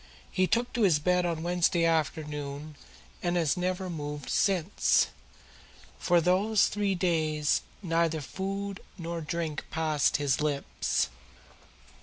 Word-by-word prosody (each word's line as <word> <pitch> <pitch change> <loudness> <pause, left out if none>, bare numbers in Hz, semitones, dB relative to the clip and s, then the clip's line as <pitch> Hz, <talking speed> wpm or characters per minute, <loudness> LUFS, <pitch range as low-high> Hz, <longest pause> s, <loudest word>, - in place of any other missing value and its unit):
He 185 0 +2
took 240 +4 0
to 240 - -1
his 185 -8 +5
bed 180 +4 +2
on 165 -2 -2
Wednesday 175 -1 +2
afternoon 150 -2 -2 0.5
and 175 0 0
has 160 -5 +2
never 185 +1 -2
moved 150 -4 -5
since. 190 -1 +2 0.9
For 175 -1 +3
these 195 +5 +3
three 200 -1 0
days 155 -4 +1 0.2
neither 165 -2 +1
food 195 +6 -4 0.2
nor 170 -1 -4
drink 160 -1 -3
has - - -15
passed 155 -2 +2
his 145 0 +1
lips." 145 -2 0
170 Hz, 125 wpm, -29 LUFS, 155-185 Hz, 0.9 s, his